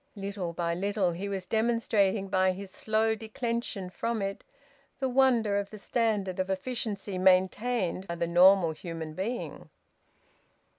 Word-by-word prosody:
Little 195 -3 -4
by 170 0 -1
little 195 0 0
he 190 +4 -4
was 190 -2 -3
demonstrating, 220 -2 +1
by 185 0 +2
his 195 +1 -8
slow 220 +2 +1
declension 225 -3 -4
from 230 +3 -2
it, 195 0 -3 0.5
the 265 - -1
wonder 245 -6 +3
of 200 0 -4
the 215 - -9
standard 205 -4 -1
of 185 0 -1
efficiency 200 -2 -3
maintained 190 +1 +2
by 170 - -3
the 170 - -1
normal 175 0 +6
human 160 -1 -6
being. 215 +9 -4
195 Hz, 140 wpm, -29 LUFS, 185-220 Hz, 0.5 s, normal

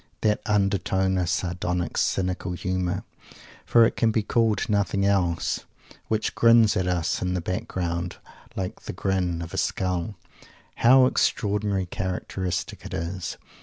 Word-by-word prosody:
That 105 -1 +2
undertone 95 -2 +1
of 90 -2 0
sardonic, 90 -1 -2
cynical 90 -1 0
humour 90 0 -2 0.6
for 115 -1 +6
it - - 0
can 115 - +2
be 110 -1 +1
called 110 -1 +1
nothing 100 -2 +1
else 90 -4 +1 0.4
which 110 -1 -1
grins 115 -2 +5
at 95 -1 0
us 90 -1 0
in 90 0 -1
the - - 0
background 90 0 -3 0.4
like 95 -1 -4
the - - -5
grin 90 -3 -1
of 85 - -9
a - - -4
Skull; 90 +2 -1 0.6
how 130 +2 +6
extraordinarily 105 -5 +1
characteristic 90 0 -3
it - - -6
is! 85 +1 -4
95 Hz, 135 wpm, -25 LUFS, 90-105 Hz, 0.6 s, for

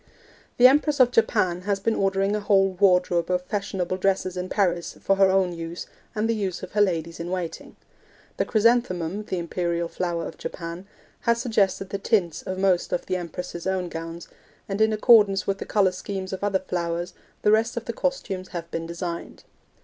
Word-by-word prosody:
The 245 - +6
Empress 290 +2 +5
of 250 -1 +6
Japan 185 -7 +2
has 200 +1 -1
been 225 +3 +1
ordering 195 0 +1
a - - 0
whole 195 -2 +3
wardrobe 180 -2 +2
of 180 0 0
fashionable 190 -2 -2
dresses 190 -1 0
in 180 0 -4
Paris 175 -4 0
for 195 - +1
her 195 -1 +5
own 190 -2 +2
use 165 +1 -6 0.3
and 215 +1 0
the 230 - +2
use 195 -5 -3
of 185 - -7
her 210 - +2
ladies 170 -4 0
in 170 +1 -4
waiting. 180 -3 -5 0.6
The - - +1
chrysanthemum 210 -5 +1
(the 185 - -3
imperial 170 0 -2
flower 170 -1 -3
of - - -11
Japan) 170 +2 -6 0.3
has 235 -1 +1
suggested 200 -5 +1
the 200 - -2
tints 195 -6 +1
of 185 - -5
most 190 -2 +1
of - - -1
the 185 - -1
Empress's 175 0 -5
own 185 -2 -1
gowns, 165 +1 -7 0.4
and 200 +1 -2
in 220 0 +4
accordance 215 -3 +5
with 195 0 -1
the - - -5
colour 195 -3 +3
schemes 190 +1 -5
of 190 - -5
other 200 -1 +2
flowers 175 0 -2 0.3
the 210 - +4
rest 225 +2 +2
of 235 - -3
the 235 - -3
costumes 210 -9 -2
have 170 -2 -7
been 165 0 -4
designed. 170 0 -6
190 Hz, 190 wpm, -25 LUFS, 175-205 Hz, 0.6 s, The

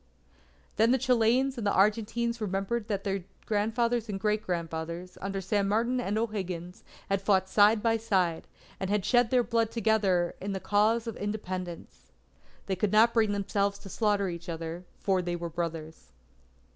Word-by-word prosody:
Then 225 +2 +4
the 260 - +4
Chileans 250 +1 +2
and 210 - -1
Argentines 225 +4 +1
remembered 205 +3 -2
that 200 -3 -2
their 195 -2 -2 0.2
grandfathers 225 +2 0
and 195 -2 -3
great 210 +1 +1
grandfathers, 170 -1 -4
under 195 0 -3
San 200 +1 0
Martin 235 +5 +1
and 210 -2 -1
O'Higgins, 185 -6 -4 0.2
had 195 0 0
fought 195 -1 +2
side 210 +2 +4
by 225 -1 +3
side, 185 -7 0 0.3
and 190 - -3
had 205 -2 0
shed 245 -2 +3
their 250 -1 +3
blood 230 -1 +1
together 205 -6 +1
in 195 +1 -3
the 190 - -3
cause 215 +4 +2
of 230 - -5
Independence. 185 - -5 0.6
They 190 - -1
could 190 +2 0
not 225 +2 +5
bring 220 -3 +3
themselves 200 0 0
to 200 - -12
slaughter 205 -1 +1
each 170 0 -6
other, 165 +2 -5
for 190 -2 +1
they 175 0 -2
were 170 0 -4
brothers. 160 - -5
205 Hz, 165 wpm, -29 LUFS, 185-225 Hz, 0.6 s, not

